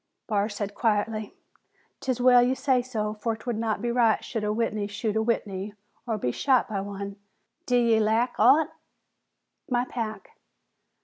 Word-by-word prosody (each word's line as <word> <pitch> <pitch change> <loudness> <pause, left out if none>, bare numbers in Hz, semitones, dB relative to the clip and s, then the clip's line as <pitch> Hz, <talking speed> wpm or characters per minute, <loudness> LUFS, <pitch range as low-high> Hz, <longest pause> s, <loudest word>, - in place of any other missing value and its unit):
Barr 210 -1 0
said 205 -1 -4
quietly, 215 -1 -1 0.6
"'Tis 255 -2 -2
well 250 0 +6
ye 250 +2 +2
say 260 -2 +2
so, 220 -4 -3
for 225 +1 -2
'twould 230 0 -4
not 220 -2 -1
be 240 - 0
right 235 -2 +2
should 225 -4 -3
a 210 - 0
Whitney 215 -2 -1
shoot 210 +1 -3
a 220 - +2
Whitney 205 -3 -2 0.3
or 225 -2 0
be 125 -11 -1
shot 260 - +2
by 200 -2 -2
one. 200 0 -6 0.5
D'ye 235 -3 +3
lack 220 +3 +2
aught?" 285 +8 +5 1.0
"My 245 -1 +1
pack." 225 -4 -5
220 Hz, 160 wpm, -26 LUFS, 210-245 Hz, 1.0 s, well